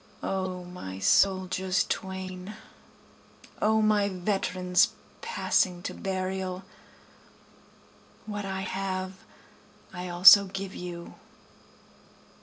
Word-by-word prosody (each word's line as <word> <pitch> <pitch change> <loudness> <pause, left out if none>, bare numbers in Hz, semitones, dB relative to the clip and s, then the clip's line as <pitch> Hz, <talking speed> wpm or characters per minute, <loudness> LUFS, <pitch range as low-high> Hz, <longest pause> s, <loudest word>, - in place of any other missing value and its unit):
O 185 -1 -3
my 175 - -8
soldiers 185 - +2
twain! 190 +1 -5 1.1
O 220 0 +3
my 210 -1 +3
veterans 185 -1 +1 0.3
passing 185 - 0
to - - -4
burial! 185 -1 -3 1.6
What 205 -1 -5
I 190 -1 -4
have 190 0 -4 0.7
I 180 0 -6
also 190 +3 +9
give 195 0 -6
you. 175 -1 -8
185 Hz, 80 wpm, -27 LUFS, 180-195 Hz, 1.6 s, also